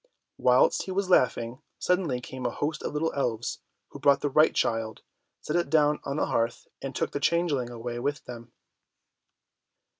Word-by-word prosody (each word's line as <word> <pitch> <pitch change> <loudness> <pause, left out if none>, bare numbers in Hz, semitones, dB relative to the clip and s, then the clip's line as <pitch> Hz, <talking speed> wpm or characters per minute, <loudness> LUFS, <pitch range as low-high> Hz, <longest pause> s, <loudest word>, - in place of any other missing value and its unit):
Whilst - - +4
he 190 - -5
was 190 0 -1
laughing, 125 -3 +2 0.2
suddenly 175 -9 0
came 130 +1 -8
a - - 0
host 150 +5 -3
of - - -3
little 160 +2 0
elves, 120 -5 -2 0.3
who - - -10
brought 140 -1 +4
the 145 - -1
right 155 +3 +5
child, 115 -1 -1 0.4
set 150 - -3
it 175 -4 +1
down 150 -1 +3
on 140 +1 -3
the - - +1
hearth, 115 0 -1
and 135 -2 -5
took - - -1
the 145 - -2
changeling 145 -6 +1
away 120 0 -5
with 145 +4 -2
them. 120 -1 -9
140 Hz, 175 wpm, -27 LUFS, 120-155 Hz, 0.4 s, right